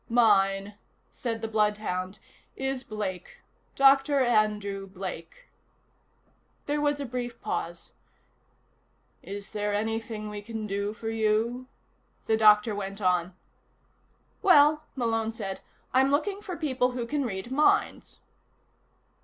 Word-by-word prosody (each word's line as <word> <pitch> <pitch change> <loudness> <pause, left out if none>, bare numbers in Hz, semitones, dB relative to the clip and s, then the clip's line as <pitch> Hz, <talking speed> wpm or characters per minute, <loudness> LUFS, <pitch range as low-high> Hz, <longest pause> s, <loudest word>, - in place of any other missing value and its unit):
"Mine," 200 -4 +3 0.4
said 230 -4 -4
the - - 0
bloodhound, 210 -3 -1 0.4
"is 265 -1 -2
Blake. 200 -6 -5 0.4
Doctor 275 +1 +5
Andrew 210 -5 +1
Blake." 190 - -8 1.2
There 295 0 -1
was 290 -1 +1
a 280 - -3
brief 245 -1 -5
pause. - - -5 1.3
"Is 200 0 -8
there 210 -1 -1
anything 225 0 -3
we 205 0 -6
can 220 0 -5
do 200 0 -2
for 225 0 -5
you?" 225 +3 0 0.6
the 220 - +2
doctor 215 0 +5
went 200 0 -5
on. 180 -2 +1 1.1
"Well," 305 -3 +5
Malone 225 -3 0
said, 195 -4 -5 0.3
"I'm 265 +1 +4
looking 390 +8 0
for 370 -4 -6
people 255 -5 0
who 245 -1 -3
can 285 +3 -1
read 210 0 -4
minds." 295 +3 +1
225 Hz, 115 wpm, -27 LUFS, 205-260 Hz, 1.3 s, Doctor